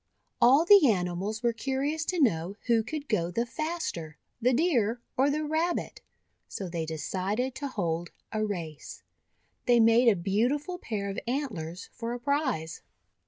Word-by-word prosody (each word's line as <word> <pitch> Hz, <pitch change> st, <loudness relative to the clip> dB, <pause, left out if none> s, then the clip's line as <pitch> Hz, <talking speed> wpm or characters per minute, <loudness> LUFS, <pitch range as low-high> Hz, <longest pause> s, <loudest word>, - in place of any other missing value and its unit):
All 275 Hz, +7 st, +6 dB
the 385 Hz, -7 st, +8 dB
animals 190 Hz, +3 st, -1 dB
were 235 Hz, -1 st, +2 dB
curious 275 Hz, +6 st, -1 dB
to 360 Hz, -, -1 dB
know 185 Hz, -, +1 dB
who 235 Hz, -2 st, +3 dB
could 285 Hz, +6 st, -5 dB
go 175 Hz, -8 st, 0 dB
the 230 Hz, +7 st, -1 dB
faster, 245 Hz, -, -4 dB, 0.2 s
the 250 Hz, +2 st, +4 dB
Deer 245 Hz, -, +2 dB, 0.2 s
or 270 Hz, +2 st, +3 dB
the 305 Hz, +2 st, 0 dB
Rabbit, 320 Hz, +3 st, -1 dB, 0.5 s
so 195 Hz, -, -5 dB
they 165 Hz, -2 st, -3 dB
decided 190 Hz, -, -2 dB
to 280 Hz, +2 st, -4 dB
hold 175 Hz, -8 st, -2 dB, 0.2 s
a 215 Hz, -1 st, -1 dB
race. 170 Hz, -8 st, -5 dB, 0.6 s
They 240 Hz, -1 st, +5 dB
made 230 Hz, +2 st, +5 dB
a 225 Hz, -, +6 dB
beau 205 Hz, +10 st, +1 dB
tiful 355 Hz, +5 st, -7 dB
pair 205 Hz, -, -3 dB
of 195 Hz, -, -4 dB
antlers 200 Hz, -, -3 dB
for 230 Hz, +1 st, -4 dB
a 245 Hz, -, -4 dB
prize. 260 Hz, -, -1 dB
230 Hz, 160 wpm, -28 LUFS, 185-280 Hz, 0.6 s, the